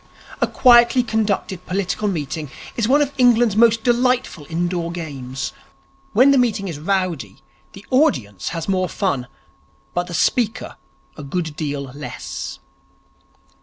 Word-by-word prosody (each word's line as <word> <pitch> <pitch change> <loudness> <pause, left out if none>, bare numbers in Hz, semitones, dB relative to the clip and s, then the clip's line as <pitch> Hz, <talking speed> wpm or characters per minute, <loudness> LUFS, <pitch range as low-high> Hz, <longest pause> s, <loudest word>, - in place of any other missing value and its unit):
A - - +3
quietly 240 0 +5
conducted 210 -5 -1
political 195 +2 -1
meeting 155 -4 -3 0.3
is 230 -3 0
one 285 +4 +4
of 285 0 -5
England's 240 -4 +4
most 225 0 +4
delightful 245 - +1
indoor 170 0 -1
games. 135 -6 -5 0.6
When 255 +5 +5
the 275 - +4
meeting 220 -5 0
is 160 -5 -5
rowdy, 165 - -2 0.4
the 195 - -12
audience 130 - +1
has 165 -2 -5
more 185 -2 0
fun, 140 -11 -1 0.7
but 175 0 -1
the 175 - -5
speaker 235 +4 0 0.4
a - - -7
good 155 +2 -3
deal 145 -3 -3
less. 140 +2 -7
190 Hz, 130 wpm, -20 LUFS, 155-235 Hz, 0.7 s, quietly